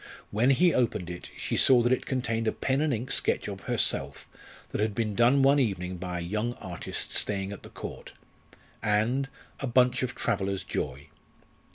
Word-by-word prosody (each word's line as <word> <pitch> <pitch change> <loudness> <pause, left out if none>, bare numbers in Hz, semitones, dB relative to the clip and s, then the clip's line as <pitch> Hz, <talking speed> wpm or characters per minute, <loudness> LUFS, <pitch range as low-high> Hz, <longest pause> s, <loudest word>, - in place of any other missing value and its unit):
When 115 +5 +3
he 170 +6 +4
opened 105 -8 0
it 85 - -8
she - - -2
saw 125 -3 +6
that 120 +2 +3
it - - -2
contained 115 -3 -1
a - - +3
pen 135 +1 0
and 155 -1 +1
ink 125 +2 -3
sketch - - +2
of - - -7
herself 70 +1 0 0.4
that - - -2
had 105 -1 0
been 110 -2 -1
done 120 +5 +4
one 140 +1 +5
evening 95 -7 -1
by 90 0 -4
a - - -3
young 105 +7 -2
artist 90 -3 -5
staying 100 -1 -1
at 100 - -8
the - - -12
Court, - - -8 0.7
and 115 +6 +1 0.3
a 135 - -2
bunch 125 +1 +3
of 130 -1 -2
traveller's 95 -1 -1
joy. 70 +2 -4
115 Hz, 185 wpm, -28 LUFS, 95-130 Hz, 0.7 s, saw